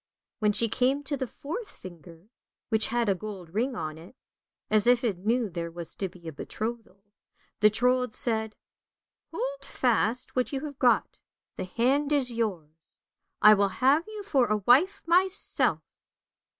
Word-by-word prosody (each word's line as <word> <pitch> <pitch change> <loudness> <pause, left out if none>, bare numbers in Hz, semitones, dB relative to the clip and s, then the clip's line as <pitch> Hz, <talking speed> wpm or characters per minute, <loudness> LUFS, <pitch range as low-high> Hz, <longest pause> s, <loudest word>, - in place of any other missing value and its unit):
When 210 -2 +3
she 215 +3 +2
came 260 +5 +1
to 285 +1 -2
the 260 -2 -3
fourth 345 - -7
finger, 175 +2 -14 0.4
which 220 -1 +2
had 235 -1 0
a 200 - +3
gold 190 -3 -8
ring 245 +5 -1
on 155 -4 -5
it, 175 +10 -14 0.5
as 215 +1 +2
if 245 0 +4
it 205 -7 -1
knew 230 +4 0
there 170 -2 -5
was 170 -1 -8
to 195 - -3
be 170 -1 -14
a - - -4
betrothal, 215 +4 -6 0.6
the 210 0 +6
Trold 250 +2 +1
said, 220 -2 +2 0.4
" - - -63
Hold - - -4
fast 245 0 0
what 255 -1 0
you 275 +1 -3
have 285 -2 -8
got, 245 -2 +2 0.4
the 185 - -4
hand 265 +9 +1
is 275 -4 +1
yours, 170 -9 -5 0.5
I 215 - +10
will 200 -1 +2
have 285 +7 +3
you 430 -1 -7
for 275 -11 +2
a 215 0 +1
wife 260 - +3
myself! 370 +3 +1
230 Hz, 165 wpm, -27 LUFS, 200-265 Hz, 0.6 s, I